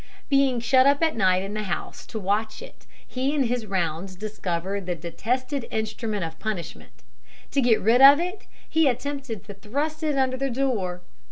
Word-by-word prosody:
Being 275 Hz, -3 st, +3 dB
shut 255 Hz, +3 st, +4 dB
up 285 Hz, +3 st, +3 dB
at 320 Hz, -, +2 dB
night 185 Hz, -4 st, +3 dB
in 195 Hz, +1 st, -5 dB
the 215 Hz, -, -2 dB
house 175 Hz, -, -5 dB
to -, -, -6 dB
watch 210 Hz, +2 st, -1 dB
it, -, -, -14 dB, 0.2 s
he 265 Hz, +3 st, -1 dB
in 285 Hz, -, +3 dB
his 240 Hz, -2 st, -2 dB
rounds 185 Hz, -1 st, -2 dB
discovered 195 Hz, -2 st, -4 dB
the 175 Hz, -, -1 dB
detested 240 Hz, -, -3 dB
instrument 220 Hz, -2 st, -3 dB
of 160 Hz, -1 st, -6 dB
punishment. 215 Hz, -6 st, -6 dB, 0.5 s
To 275 Hz, -, +2 dB
get 235 Hz, -3 st, +4 dB
rid 230 Hz, +5 st, +4 dB
of 280 Hz, +2 st, +10 dB
it, 360 Hz, +4 st, -4 dB, 0.2 s
he 320 Hz, -2 st, +3 dB
attempted 270 Hz, -4 st, -3 dB
to 205 Hz, -1 st, -9 dB
thrust 285 Hz, -, -3 dB
it 300 Hz, -3 st, 0 dB
under 260 Hz, -1 st, +1 dB
the 275 Hz, +1 st, -1 dB
door. 220 Hz, -9 st, -1 dB
225 Hz, 180 wpm, -25 LUFS, 195-275 Hz, 0.5 s, of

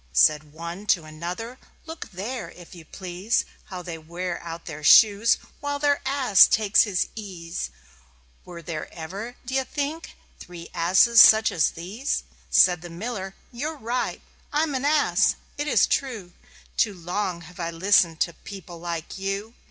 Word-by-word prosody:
Said 150 Hz, -, +3 dB
one 170 Hz, +6 st, -8 dB
to 175 Hz, -5 st, +3 dB
another: 175 Hz, +11 st, -7 dB, 0.3 s
"Look 320 Hz, 0 st, -8 dB
there, 220 Hz, +7 st, -5 dB
if 175 Hz, -1 st, -14 dB
you 170 Hz, -3 st, -12 dB
please, 185 Hz, +5 st, -2 dB, 0.2 s
How 180 Hz, -2 st, -8 dB
they 165 Hz, -2 st, -6 dB
wear 170 Hz, +2 st, -5 dB
out 165 Hz, 0 st, -8 dB
their 155 Hz, -2 st, -8 dB
shoes, 210 Hz, +7 st, +6 dB, 0.2 s
while 285 Hz, 0 st, -2 dB
their 285 Hz, 0 st, +1 dB
Ass 265 Hz, -8 st, +6 dB
takes 210 Hz, 0 st, +4 dB
his 195 Hz, -4 st, -1 dB
ease. 180 Hz, -, -6 dB, 0.7 s
Were 170 Hz, -1 st, -10 dB
there 155 Hz, -1 st, -6 dB
ever, 195 Hz, +9 st, -7 dB
d'ye 265 Hz, +1 st, 0 dB
think, 290 Hz, +4 st, -5 dB, 0.2 s
three 175 Hz, -1 st, -10 dB
such -, -, -15 dB
asses 190 Hz, +8 st, +7 dB, 0.2 s
as 160 Hz, -, +2 dB
these?" 205 Hz, -, -3 dB, 0.3 s
Said 175 Hz, -3 st, +5 dB
the 175 Hz, -, -9 dB
Miller: 195 Hz, +2 st, -5 dB, 0.2 s
"You're 300 Hz, +6 st, -4 dB
right. 245 Hz, 0 st, -3 dB, 0.3 s
I'm 300 Hz, 0 st, 0 dB
an 260 Hz, +1 st, -2 dB
Ass! 300 Hz, 0 st, +3 dB, 0.2 s
It 295 Hz, -, -2 dB
is -, -, +4 dB
true. 225 Hz, -10 st, -2 dB, 0.4 s
Too 210 Hz, -3 st, +2 dB
long 180 Hz, 0 st, -3 dB
have 175 Hz, +1 st, -14 dB
I 170 Hz, -1 st, -2 dB
listened 170 Hz, -1 st, +3 dB
to 170 Hz, -, +1 dB
people 180 Hz, -3 st, -10 dB
like 170 Hz, +1 st, -5 dB
you. 195 Hz, +3 st, -3 dB
190 Hz, 155 wpm, -25 LUFS, 170-235 Hz, 0.7 s, asses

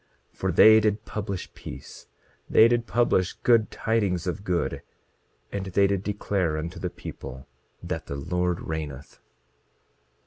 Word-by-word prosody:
For -, -, -1 dB
they 110 Hz, 0 st, +8 dB
did 110 Hz, 0 st, 0 dB
publish 100 Hz, -3 st, -5 dB
peace; 65 Hz, -, -10 dB, 0.4 s
they 110 Hz, -, +7 dB
did 120 Hz, -1 st, +1 dB
publish 105 Hz, -6 st, +2 dB
good 115 Hz, -3 st, +3 dB
tidings 100 Hz, -6 st, 0 dB
of 95 Hz, +2 st, -3 dB
good; 90 Hz, -4 st, -1 dB, 0.7 s
and 100 Hz, -1 st, -4 dB
they 100 Hz, +1 st, +3 dB
did 100 Hz, -1 st, +1 dB
declare 100 Hz, -5 st, -1 dB
unto 85 Hz, +4 st, -5 dB
the 90 Hz, -, -2 dB
people 65 Hz, -5 st, -9 dB, 0.4 s
that -, -, -4 dB
the 70 Hz, -, -4 dB
Lord 90 Hz, +4 st, -1 dB
reigneth. 75 Hz, -3 st, -6 dB
95 Hz, 135 wpm, -26 LUFS, 85-105 Hz, 0.7 s, they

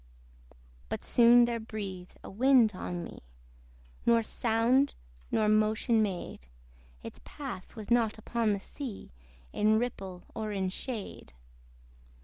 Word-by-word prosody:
But -, -, -4 dB
soon 240 Hz, 0 st, +6 dB
there 235 Hz, -1 st, -2 dB
breathed 195 Hz, -5 st, -7 dB
a -, -, -8 dB
wind 240 Hz, 0 st, +4 dB
on 180 Hz, -1 st, -5 dB
me, -, -, -9 dB, 0.8 s
Nor 230 Hz, -1 st, +4 dB
sound 235 Hz, +5 st, +2 dB, 0.3 s
nor 215 Hz, -1 st, +2 dB
motion 215 Hz, +2 st, +3 dB
made: 180 Hz, -, -4 dB, 0.6 s
Its -, -, -9 dB
path 270 Hz, -10 st, -8 dB
was 220 Hz, +1 st, -8 dB
not 230 Hz, -3 st, +3 dB
upon 220 Hz, 0 st, 0 dB
the 200 Hz, -, -2 dB
sea, 240 Hz, -, -7 dB, 0.4 s
In 215 Hz, +1 st, +3 dB
ripple 195 Hz, -6 st, -4 dB
or 215 Hz, -1 st, -4 dB
in 190 Hz, -2 st, -1 dB
shade. 205 Hz, -, -6 dB
220 Hz, 125 wpm, -30 LUFS, 200-235 Hz, 0.8 s, soon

